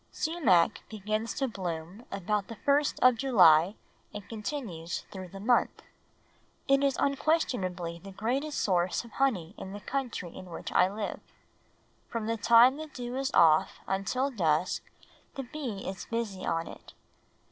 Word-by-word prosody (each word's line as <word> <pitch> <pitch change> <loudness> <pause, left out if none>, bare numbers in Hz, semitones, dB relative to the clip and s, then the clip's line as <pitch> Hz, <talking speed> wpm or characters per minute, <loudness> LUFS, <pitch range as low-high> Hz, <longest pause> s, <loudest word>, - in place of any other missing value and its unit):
Sumac 305 - +2
begins 215 +1 -3
to 270 - 0
bloom 180 0 -6
about 200 +1 -1
the 230 - -8
first 285 +4 +1
of 255 -2 +6
July 185 - +5 0.4
and 205 -2 -8
continues 210 - -5
through 190 -2 -7
the 195 +2 -10
month. 240 +4 +1 0.8
It 275 0 +4
is 275 -1 +2
unquestionably 195 - 0
the 195 - -9
greatest 260 +10 -2
source 180 0 +1
of 235 - -14
honey 205 -11 0
in 190 - -7
the 205 - -6
country 240 -6 -4
in 185 - -9
which 165 - -6
I 185 +1 +4
live. 210 0 -4 0.9
From 230 -2 -3
the 230 +1 0
time 235 +5 +6
the 315 0 -6
dew 245 -3 -6
is 270 0 -1
off 160 -2 +5
until 250 +8 -1
dusk 170 - +1 0.5
the 270 - -4
bee 245 -7 -6
is 190 0 -6
busy 225 -5 -3
on 165 0 0
it. - - -12
215 Hz, 150 wpm, -29 LUFS, 185-260 Hz, 0.9 s, of